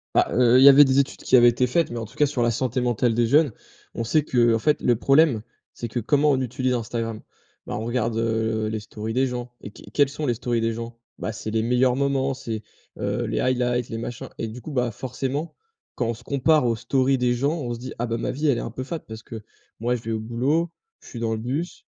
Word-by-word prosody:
Bah, - - +4
heu, 125 +1 +5
il 130 - +6
y 140 - +11
avait 140 +1 +8
des 130 0 +2
études 140 - -1
qui - - +3
avaient 120 -1 +7
été 125 +1 +1
faites, 165 +1 +1
mais 120 - -4
en 115 - -4
tout 115 +6 -16
cas 150 - +3
sur 135 -4 -2
la 120 - +3
santé 125 +2 -1
mentale 120 -1 +1
des 120 0 +2
jeunes, 145 0 +4 0.4
on 115 - -3
sait 150 +6 +2
que, 130 - -4
heu, 115 -1 +5
en 115 - 0
fait 150 +5 +1
le 120 - +3
problème, 135 -3 +3 0.3
c'est 120 - -5
que, 120 +2 -3
comment 145 +6 +2
on 130 -1 +1
utilise 130 +1 -1
Instagram? 115 -1 -3 0.5
Bah, - - -4
on 110 - -4
regarde, 120 -2 -1
heu, 110 -1 0
les 110 0 -3
stories 105 +1 -6
des 130 +1 +2
gens 125 -1 -5
et - - -8
qu 105 - -15
quelles 145 -2 +3
sont 150 +2 -4
les 120 - +2
stories 120 0 -1
des 115 0 0
gens? 115 +1 -7 0.2
Bah, 110 - -3
c'est 110 0 -6
les 110 - +1
meilleurs 125 +2 +2
moments, 140 0 0
c'est, 115 -4 -5 0.3
heu, - - -2
les - - -1
highlights, 125 -1 0
les 115 - -4
machins 120 0 -6
et 115 - -2
du 115 +3 -8
coup 150 - -8
bah, 125 -3 0
forcément, 135 +6 -4 0.4
quand 120 - -2
on 115 - 0
se 120 - -16
compare 140 0 +2
aux 115 - +2
stories 130 +3 +1
des 125 -1 +2
gens, 140 +5 0
on 120 -4 -3
se 115 - -10
dit: 130 - -7
«Ah 120 - -1
bah 115 - -2
ma - - -2
vie 150 +3 -1
elle 135 -5 +3
est - - -2
un - - -5
peu 130 - -5
fade, 160 +4 -5
parce 110 0 -8
que 110 -1 -9 0.4
moi 120 +2 0
je 115 - -6
vais 115 - -5
au 110 - -1
boulot, 135 +10 0 0.3
je - - -17
suis 120 - -7
dans 115 -1 -1
le 110 - -3
bus. 140 +10 -4
120 Hz, 270 wpm, -24 LUFS, 115-135 Hz, 0.5 s, y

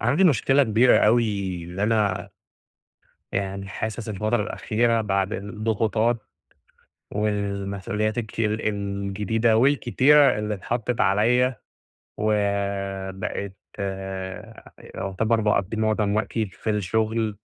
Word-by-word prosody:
عندي 140 - +3
مشكلة 140 - +4
كبيرة 115 +1 +4
أوي، 115 +2 +4 0.4
اللي 90 +3 -5
أنا 105 -3 +1 1.0
يعني 100 0 -3
حاسس 110 +2 -4
الفترة 105 +2 0
الأخيرة 115 +2 0
بعد 100 -1 0
الضغوطات، 110 +2 0 1.0
والمسؤوليات 105 +1 -2
الك 110 -1 -4
الجديدة 105 +1 0
والكتيرة 140 +2 +4
اللي 105 0 -2
إتحطت 115 +4 -2
عليَّ، 120 +7 +3 0.6
وبقيت 100 -2 -2 1.4
يُعتبر 110 +4 0
باقضي 105 0 0
معظم 110 -1 +1
وقتي 110 0 -1
في 100 +3 -6
الشغل، 110 +1 0
105 Hz, 90 wpm, -24 LUFS, 100-115 Hz, 1.4 s, مشكلة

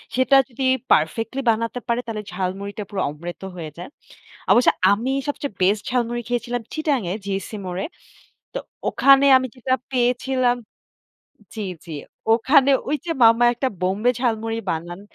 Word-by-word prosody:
সেটা 260 +1 +4
যদি 260 +2 -5 0.3
perfectly 225 - +1
বানাতে 230 +2 0
পারে 235 +1 +1
তাহলে 215 -2 -5
ঝালমুড়িটা 195 +3 -4
পুরো 195 -2 -3
অমৃত 170 +4 -8
হয়ে 165 -3 -6
যায়। 175 - -8 0.6
অবশ্য 245 - +6 0.2
আমি 230 +6 0 0.2
সবচেয়ে 285 -5 -3
best 205 +3 +3
ঝালমুড়ি 240 -1 -1
খেয়েছিলাম 245 0 -2
চিটাগাং-এ, 275 - -1
GEC 195 -1 -3 0.2
মোড়ে। 180 +1 -3 0.7
তো - - -2 0.3
ওখানে 275 0 +5
আমি 260 - -2
যেটা 255 +1 -1 0.2
পেয়েছিলাম 250 0 +1 1.0
জি, 220 - -4 0.2
জি। 165 - -8 0.4
ওখানে 270 +4 +4 0.2
ওইযে 305 +3 -2
মামা 230 +1 +6
একটা 260 +2 -1
বোম্বে 195 +7 +1
ঝালমুড়ি 225 -2 -1
বানান। 175 +3 -4
230 Hz, 135 wpm, -22 LUFS, 195-255 Hz, 1.0 s, অবশ্য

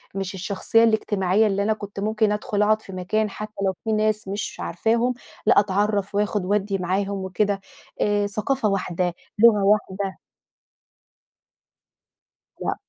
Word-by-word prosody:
مش 195 0 -3
الشخصية 200 +4 +1
الاجتماعية 215 -2 +2
اللي 200 0 0
أنا 220 +1 +2
كنت 205 -2 -8
ممكن 215 0 +1
أدخل 210 0 -1
أقعد 215 +1 +3
في 195 - -11
مكان 210 +4 -1
حتى 215 +1 -7
لو 190 - +1
في 225 - -1
ناس 215 -1 0
مش 200 +2 -4
عارفاهم، 230 +7 0 0.3
لأ - - +6
أتعرّف 205 0 0
وآخُد 205 -2 0
وادّي 200 0 0
معاهم 195 +2 -1
وكده، 200 +1 0 0.4
آآ، 205 -1 +2
ثقافة 215 +3 0
واحدة، 180 -2 -1 0.3
لغة 215 -3 +6
واحدة 200 -2 0 2.4
لأ. - - -1
205 Hz, 135 wpm, -23 LUFS, 195-215 Hz, 2.4 s, لأ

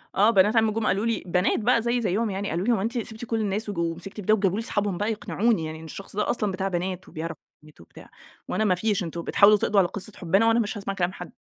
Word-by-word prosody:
آه 210 +3 +5
بنات 210 +1 +4
عمي 220 -1 +4
جم 220 0 -2
قالوا 195 +4 +1
لي، 230 -3 -1
بنات 180 +1 +1
بقى 230 +1 +3
زيي 240 +1 0
زيهم 215 +2 0
يعني، 195 +1 -3
قالوا 170 +4 -2
لي: 240 - +4
"هو 195 - 0
أنتِ 230 +4 -2
سِبتِ 225 0 -5
كل 225 -1 -1
الناس 210 +1 -2
وج 205 - -5
ومسكتِ 170 +3 -3
في 210 - -6
ده؟" 215 +2 +2
وجابوا 195 -2 +1
لي - - -3
أصحابهم 205 -5 -1
بقى 210 +4 -1
يقنعوني 215 -3 0
يعني، 155 0 -6
إن 160 - -10
الشخص 195 +5 -8
ده 210 - 0
أصلًا 210 -4 0
بتاع 190 +1 -2
بنات 185 0 -3
وبيعرف 165 0 -5 0.3
بنات 155 - -17
وبتاع، - - -15 0.4
وأنا 220 - -1
ما 190 -4 +3
فيش 205 +1 0
"أنتم 170 0 -5
بتحاولوا 205 +4 +5
تقضوا 205 0 +2
على 180 - +4
قصّة 200 +3 +1
حبنا 195 +6 +2
وأنا 230 +1 +4
مش 220 0 -2
هاسمع 195 -1 -4
كلام 180 -1 -1
حد." 180 -2 -9
200 Hz, 270 wpm, -25 LUFS, 180-220 Hz, 0.4 s, آه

